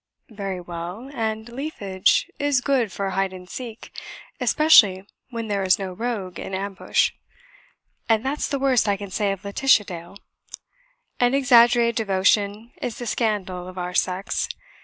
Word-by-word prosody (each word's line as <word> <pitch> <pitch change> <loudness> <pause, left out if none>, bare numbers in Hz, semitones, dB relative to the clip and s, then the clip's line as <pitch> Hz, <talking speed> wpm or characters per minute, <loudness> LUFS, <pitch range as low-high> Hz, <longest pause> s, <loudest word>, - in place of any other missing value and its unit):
"Very 195 -3 -4
well; 175 +8 -7
and 220 -2 -3
'leafage' 235 -8 0
is 285 -2 +2
good 245 -5 +1
for 195 0 -3
hide 190 0 -1
and 180 -1 -10
seek; 235 +1 -9 0.4
especially 205 - +5 0.2
when 230 -2 -5
there 200 -2 -1
is 185 -1 +3
no 190 -2 -5
rogue 200 -4 -4
in 190 - -5
ambush. 195 +1 0 1.0
And 225 +2 +2
that's 285 +3 -1
the 280 - -1
worst 265 -5 +2
I 200 - +1
can 200 -1 -8
say 200 +1 0
of 195 0 -6
Laetitia 215 +3 +3
Dale. 175 +1 -9 1.0
An 245 +2 +3
exaggerated 240 -3 +5
devotion 205 +2 +1
is 235 - -4
the 240 - -6
scandal 200 -6 -2
of 185 0 -10
our 180 0 -4
sex. 185 +2 0
205 Hz, 150 wpm, -23 LUFS, 190-240 Hz, 1.0 s, especially